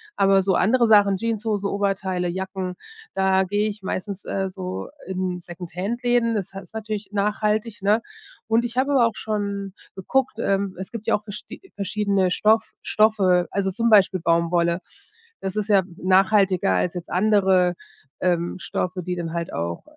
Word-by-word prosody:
Aber 195 0 +4
so 190 0 +1
andere 235 +5 +3
Sachen, 205 -3 +5
Jeanshose, 215 -1 -1
Oberteile, 190 -3 -1
Jacken, 190 0 -4 0.4
da 190 0 +3
gehe 205 +3 0
ich 210 -1 -5
meistens, 190 +1 -4
äh, 195 -1 -2
so 185 -1 -5 0.2
in 185 -1 -2
Second-Hand-Läden 225 +8 -1
das 200 -4 -3
das 195 0 -8
ist - - -25
natürlich 215 -2 -5
nachhaltig, 210 +1 -1
ne? 210 +3 +3 0.5
Und 225 +1 +3
ich 240 +1 -4
habe 270 +2 +2
aber 245 -4 +5
auch 225 - -5
schon 200 -2 -3 0.2
geguckt. 255 +7 0
Ähm, 195 -3 0
es 190 - -6
gibt 230 -2 -7
ja - - +4
auch 210 - -5
versch 210 -1 -6 0.3
verschiedene 200 -2 0
Stoff 220 +4 +2
Stoffe, 195 -5 +3
also 195 -1 0
zum 230 +5 0
Beispiel 195 -4 +5
Baumwolle. 170 +1 +2 0.6
Das 190 0 -4
ist 210 -1 -1
ja 200 -2 +5
nachhaltiger 190 - +3
als 165 - 0
jetzt 175 -2 -7
andere, 190 -2 +3 0.5
ähm, 175 -1 0
Stoffe, 180 0 -3
die 180 +1 -3
dann 170 -2 -4
halt 170 0 -3
auch 85 +1 -3
195 Hz, 160 wpm, -23 LUFS, 185-215 Hz, 0.6 s, Sachen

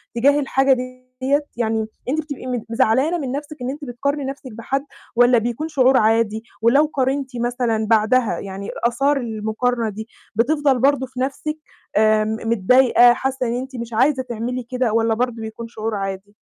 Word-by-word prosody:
تجاه 280 +5 +4
الحاجة 270 -1 +3
ديّة؟ 255 +3 -2
يعني 220 -2 0 0.2
أنتِ 315 +3 0
بتبقي 285 -4 -7
مت 245 -3 -3
زعلانة 260 +8 +2
من 270 -5 -4
نفْسِك 295 +2 -5
إن 250 - -2
أنتِ 290 +1 -6
بتقارني 280 +4 -2
نفْسِك 270 -2 -7
بحد 270 +5 -3 0.3
والّا 245 0 +5
بيكون 240 +7 -2
شعور 265 -3 +4
عادي، 220 0 +2 0.2
ولو 275 +7 +5
قارنتِ 270 0 0
مثلًا 235 -2 -1
بعدها، 220 -3 +2
يعني 195 0 -7 0.2
آثار 275 +4 +1
المقارنة 225 0 -1
دي 220 +2 -7 0.3
بتفضَل 275 +2 +2
برضو 270 0 +3
في 255 0 -10
نفْسِك 305 +3 -3 0.4
آمم 215 0 +3
م - - -1
متضايقة، 240 +3 +5
حاسة 265 0 -2
إن 230 - -1
أنتِ 260 +1 -5
مش 235 -1 -6
عايزة 260 +3 +2
تعملي 245 +1 -4
كده، 245 -2 -1
والّا 225 0 +2
برضو 235 -1 -2
بيكون 220 +1 -7
شعور 220 -1 -4
عادي؟ 195 +1 -5
245 Hz, 170 wpm, -21 LUFS, 225-270 Hz, 0.4 s, والّا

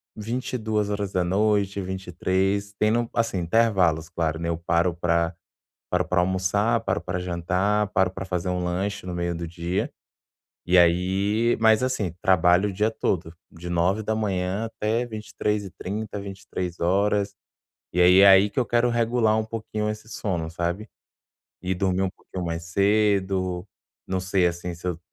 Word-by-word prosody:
22h 105 -4 -1
23h 95 +2 -1
tendo, 115 +3 +1
assim, 115 -4 0
intervalos, 90 -4 +2
claro, 80 -3 -1
né, 85 0 -2
eu 85 - -1
paro 85 +1 +1
pra 85 0 0 0.6
paro - - +1
pra 90 - +2
almoçar, 95 +5 +1
paro 95 -6 -1
pra 90 +1 -3
jantar, 90 +4 0
paro 95 -2 +2
pra 95 +1 -6
fazer 90 -1 -2
um 90 0 -1
lanche 95 +3 -2
no 90 - -4
meio 85 0 -2
do 85 0 -5
dia, 85 +3 -3 0.8
e 90 +1 +5
aí 95 +6 +3
mas, 110 0 +5
assim, 125 -8 -1
trabalho 90 +2 +4
o - - -6
dia 105 +4 +1
todo, 85 -6 -2 0.2
de 85 +1 -8
9h 95 +2 0
até 115 +1 -1
23h30, 105 -1 -4
23h. 100 +1 -1 0.6
E 90 - +1
aí 90 +2 +7
é 100 - +8
aí 95 +1 +7
que - - -5
eu - - +2
quero 120 +1 +2
regular 115 -1 +2
um 110 - 0
pouquinho 110 -1 -4
esse 105 +1 -7
sono, 90 -8 -3
sabe, 85 +6 -3 0.7
e 90 +1 -1
dormir 95 0 0
um 95 - 0
pouquinho 90 0 -7
mais 85 0 -3
cedo, 95 -1 +1 0.4
não 95 0 -1
sei, 95 -1 +2
assim, 85 +1 -4
se 85 +2 -7
eu 85 -2 -2
95 Hz, 150 wpm, -25 LUFS, 90-105 Hz, 0.8 s, é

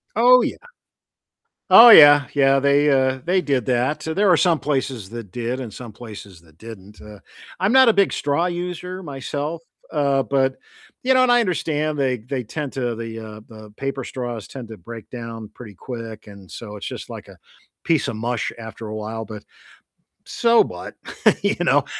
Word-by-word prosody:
Oh, 250 +2 +6
yeah. - - -2 1.2
Oh, 240 - +11
yeah, 145 - +9
yeah, 135 -1 +3
they, 140 +1 +3
uh, 130 -1 +2
they 185 +2 +1
did 135 -8 -1
that, 125 +4 0
there 195 +6 0
were 180 - +6
some 170 -2 +2
places 130 -8 -3
that 115 -5 -8
did, 125 +2 -4
and 115 -5 -8
some 120 -3 -10
places 105 -6 -11
that 80 -2 -24
didn't. 105 -1 -12
Uh, 105 -1 -12 0.4
I'm 195 +4 +2
not 260 -1 +6
a 225 - +5
big 200 -1 +2
straw 145 +5 0
user 180 +1 -5
myself, 145 +1 -5 0.3
uh, 140 -3 +1
but 135 -1 0 0.5
you 260 - +3
know, 255 0 +4
and 250 - +3
I 245 - +5
understand 155 -7 -1
they 130 -3 0
they 125 +3 -5
tend 145 +4 -6
to 120 -3 -2
the 115 0 -7
uh, 110 -1 -10
the 110 -2 -14
paper 135 0 -4
straws 120 -4 -6
tend 125 -4 -9
to 110 -2 -10
break 115 +5 -11
down 115 -3 -8
pretty 110 -4 -11
quick, 115 +1 -9
and, 100 -2 -14
so, 105 -3 -9
it's 105 - -8
just - - -8
like - - -10
a - - -15 0.5
piece 165 -3 +1
of 110 - -5
mush 120 +1 -2
after 110 0 -9
a 110 - -6
while. 110 +1 -5
But, 105 -1 -9 0.8
so, 235 0 +2
what, - - -9 0.5
you - - +1
know, - - +3
130 Hz, 185 wpm, -21 LUFS, 110-155 Hz, 1.2 s, Oh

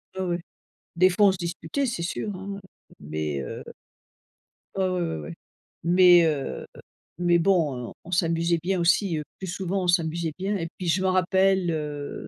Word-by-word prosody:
Ouais, 190 - -3
ouais, 175 -1 -1 0.6
des 185 +2 +5
fois, 200 +3 +4
on 195 - +6
se 190 - -4
disputait 170 - -3
c'est 235 -9 -3
sûr, 190 +4 -3
hein, 195 +1 -6 0.4
mais 75 -1 -3
heu - - -6 1.1
Ah, 190 -1 +1
ouais, 180 - -1
ouais, 170 - -2
ouais 75 -1 -7 0.5
mais, 175 0 +7
heu, 150 -4 -2 0.5
mais 175 0 +3
bon, 155 -10 +1
heu, - - -11
on - - -11
s'amusait 170 -1 +1
bien 185 +2 0
aussi, 180 0 +2
heu, 150 - -3 0.2
plus 190 - -5
souvent 185 +2 -2
on - - -2
s'amusait 165 -2 +1
bien 200 +2 -1
et 165 -3 -3
puis 180 - -5
je 175 +3 +2
m'en 190 -1 +2
rappelle, 190 0 +3
heu 150 -2 -5
175 Hz, 180 wpm, -25 LUFS, 165-190 Hz, 1.1 s, mais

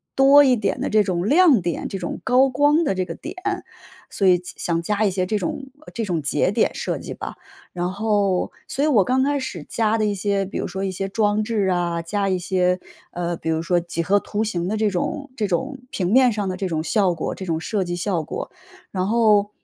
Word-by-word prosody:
多 275 +2 +7
一 255 -2 +4
点 210 -3 -2
的 - - -1
这 215 -1 +4
种 180 0 -1
亮 300 - +5
点 170 0 -3
这 195 - -5
种 175 - -4
高 260 +1 +4
光 290 +5 +3
的 285 - +1
这 185 - 0
个 - - -6
点， - - -8 0.8
所 195 - +1
以 180 -1 +6
加 180 - -9
想 170 -1 -1
加 210 +3 0
一 - - +3
些 185 -1 -1
这 210 +2 -1
种 270 +9 -3 0.3
这 230 -2 -3
种 170 -5 -1
节 145 - +1
点 - - +1
设 - - -3
计 - - -7
吧。” - - -7 0.4
然 180 0 -2
后 200 -2 0 0.2
所 280 - 0
以 - - +2
我 225 -10 +4
刚 260 +4 +1
开 285 0 +1
始 175 - -6
加 225 -1 +1
的 215 - +1
一 205 - 0
些， 200 0 0
比 190 - -6
如 - - -2
说 190 +2 -4
一 195 - -1
些 195 +1 -4
装 210 +1 +1
置 215 -3 0
啊， 175 -2 0
加 200 +3 -1
一 185 - +1
些， 180 0 +1 0.3
呃， 175 0 -2
比 160 - -4
如 160 0 0
说 175 +1 +2
几 170 -1 -3
何 200 +4 +3
图 210 +2 -2
形 175 -5 -2
的 215 +2 -1
这 215 -1 +2
种 280 - -3
这 215 -4 -1
种 200 - -2
平 185 0 -2
面 255 -1 +6
上 205 -2 -2
的 185 - -2
这 190 0 -3
种 160 -2 -2
效 195 -1 +2
果 - - -3
这 190 - -8
种 160 -1 0
设 200 +2 -1
计 175 0 -3
效 175 -2 -1
果， - - -6 0.4
然 185 0 -1
后 210 -2 +3
200 Hz, 255 characters per minute, -22 LUFS, 180-220 Hz, 0.8 s, 多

